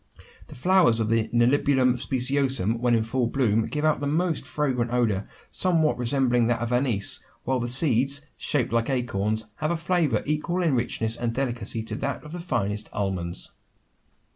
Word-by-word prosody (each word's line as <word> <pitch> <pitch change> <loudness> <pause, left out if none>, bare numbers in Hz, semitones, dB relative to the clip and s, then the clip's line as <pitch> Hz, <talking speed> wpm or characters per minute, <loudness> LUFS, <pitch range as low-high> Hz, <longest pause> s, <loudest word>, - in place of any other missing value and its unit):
The - - -12
flowers 170 -4 +3
of 110 -1 0
the 115 -1 +1
Nelumbium 125 +2 +3
speciosum 130 -3 +1
when 120 -1 +2
in 115 - +1
full 120 +2 -1
bloom, 115 -4 +1
give 150 +1 -2
out 155 -2 +2
a 145 - -1
most 160 -1 0
fragrant 130 -4 -1
odour 110 -5 0 0.2
somewhat 165 -7 +2
resembling 125 -1 +2
that 120 -1 +1
of 120 +1 -2
anise; 125 -6 +1 0.2
while 130 0 0
the 120 - -2
seeds, 135 +1 +3 0.2
shaped 130 -6 -1
like 115 +1 +1
acorns, 110 -4 -1
have 155 - -1
a 170 - 0
flavour 165 -3 0
equal 155 +5 -1
in 160 -5 +2
richness 115 -2 0
and 120 -1 -2
delicacy 120 -4 -2
to 110 - -5
that 140 -1 -3
of 150 - -10
the 175 - -6
finest 105 - -2
almonds. 95 -3 -3
125 Hz, 170 wpm, -25 LUFS, 115-145 Hz, 0.2 s, flowers